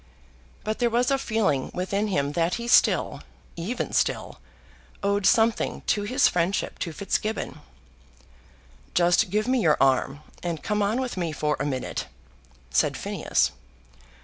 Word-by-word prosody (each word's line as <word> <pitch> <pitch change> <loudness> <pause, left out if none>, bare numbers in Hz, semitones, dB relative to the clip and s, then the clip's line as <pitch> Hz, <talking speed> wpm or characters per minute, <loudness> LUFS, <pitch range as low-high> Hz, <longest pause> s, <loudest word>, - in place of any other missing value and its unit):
But 215 +1 -3
there 240 -1 +3
was 240 +3 +1
a 275 - +2
feeling 215 - 0
within 200 +3 -1
him 145 -8 0
that 170 +3 0
he 235 0 -5
still, - - +3 0.3
even 200 +9 -3
still, - - 0 0.6
owed 200 0 +2
something 230 -1 +2
to 210 - +1
his 255 +7 +3
friendship 180 +3 -1
to 170 - -3
Fitzgibbon. 200 +1 -2 1.4
"Just 175 +4 +4
give 210 +4 0
me 260 0 +2
your 155 -6 +4
arm, 135 +1 +2 0.2
and 170 -3 -4
come 210 0 0
on 210 +5 +1
with 255 -6 -3
me 170 -3 -1
for 150 -1 0
a - - -1
minute," 130 -3 -3 0.6
said - - +2
Phineas. - - 0
200 Hz, 145 wpm, -25 LUFS, 165-225 Hz, 1.4 s, Just